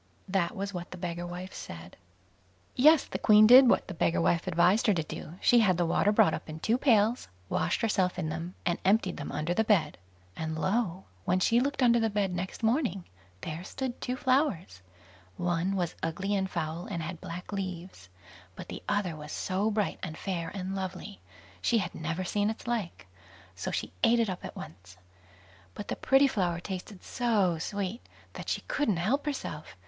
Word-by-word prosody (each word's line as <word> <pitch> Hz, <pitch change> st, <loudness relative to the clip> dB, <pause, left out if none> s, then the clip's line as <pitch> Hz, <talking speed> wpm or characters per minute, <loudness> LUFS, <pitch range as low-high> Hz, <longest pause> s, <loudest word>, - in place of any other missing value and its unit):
That 185 Hz, -3 st, 0 dB
was 200 Hz, +1 st, -4 dB
what 175 Hz, 0 st, -6 dB
the 180 Hz, -, -8 dB
beggar 175 Hz, -1 st, -4 dB
wife 180 Hz, +2 st, -7 dB
said. 85 Hz, +1 st, -9 dB, 0.8 s
Yes; 305 Hz, +4 st, +6 dB
the -, -, -5 dB
Queen 215 Hz, -1 st, +7 dB
did 250 Hz, +3 st, +9 dB
what -, -, +2 dB
the 190 Hz, -, -5 dB
beggar 170 Hz, 0 st, +1 dB
wife 170 Hz, +2 st, +1 dB
advised 180 Hz, +6 st, +3 dB
her 210 Hz, -, +4 dB
to 165 Hz, -, 0 dB
do; 155 Hz, +1 st, -8 dB
she 240 Hz, -, +5 dB
had 190 Hz, -6 st, +3 dB
the 175 Hz, -, +2 dB
water 195 Hz, +5 st, +2 dB
brought 165 Hz, -6 st, +4 dB
up -, -, -5 dB
in 155 Hz, 0 st, -6 dB
two 225 Hz, +9 st, +1 dB
pails, 230 Hz, -3 st, +3 dB, 0.2 s
washed -, -, 0 dB
herself 190 Hz, -5 st, +1 dB
in 155 Hz, -, -2 dB
them, 165 Hz, +3 st, -5 dB
and 175 Hz, -1 st, 0 dB
emptied 195 Hz, -1 st, +2 dB
them 145 Hz, -, -5 dB
under 155 Hz, +3 st, -1 dB
the 220 Hz, -, +2 dB
bed; 175 Hz, -, +2 dB, 0.4 s
and 160 Hz, 0 st, -4 dB
lo! 190 Hz, 0 st, 0 dB, 0.2 s
when 185 Hz, +1 st, +2 dB
she 230 Hz, +6 st, +3 dB
looked 275 Hz, +1 st, 0 dB
under 235 Hz, -1 st, +5 dB
the 225 Hz, -1 st, +1 dB
bed 200 Hz, -3 st, 0 dB
next 180 Hz, +5 st, -5 dB
morning, 225 Hz, -, +1 dB, 0.4 s
there 160 Hz, +2 st, -5 dB
stood 255 Hz, +5 st, -5 dB
two 250 Hz, -, -2 dB
flowers; 255 Hz, -, 0 dB, 0.6 s
one 175 Hz, +2 st, 0 dB
was 175 Hz, -3 st, -1 dB
ugly 190 Hz, +5 st, -2 dB
and 190 Hz, -1 st, 0 dB
foul, 165 Hz, -1 st, -3 dB
and 170 Hz, -5 st, -4 dB
had 165 Hz, +1 st, -6 dB
black 175 Hz, +4 st, -7 dB
leaves; 185 Hz, -, -6 dB, 0.5 s
but -, -, -9 dB
the -, -, -6 dB
other 205 Hz, -5 st, 0 dB
was 150 Hz, 0 st, -9 dB
so 195 Hz, +3 st, -1 dB
bright, 210 Hz, -2 st, -1 dB
and 160 Hz, -4 st, -5 dB
fair, 170 Hz, -4 st, -3 dB
and 190 Hz, 0 st, -4 dB
lovely, 190 Hz, +1 st, -6 dB, 0.4 s
she 235 Hz, -, +2 dB
had 185 Hz, -5 st, -2 dB
never 165 Hz, +3 st, -3 dB
seen 205 Hz, +3 st, 0 dB
its 220 Hz, -, -6 dB
like; 215 Hz, -, -3 dB, 0.5 s
so 90 Hz, -, -4 dB
she 80 Hz, -, -3 dB
ate 235 Hz, +1 st, +5 dB
it 225 Hz, -4 st, +1 dB
up 180 Hz, -, -7 dB
at -, -, -7 dB
once. 90 Hz, +2 st, -11 dB, 0.8 s
But 205 Hz, -, -7 dB
the -, -, -1 dB
pretty 270 Hz, +1 st, +4 dB
flower 180 Hz, -9 st, 0 dB
tasted 185 Hz, +1 st, -7 dB
so 205 Hz, -9 st, +1 dB
sweet, 200 Hz, +5 st, -3 dB, 0.3 s
that -, -, -7 dB
she -, -, -1 dB
couldn't 220 Hz, -11 st, 0 dB
help 255 Hz, -, 0 dB
herself. 155 Hz, -, -5 dB
185 Hz, 195 wpm, -29 LUFS, 170-220 Hz, 0.8 s, did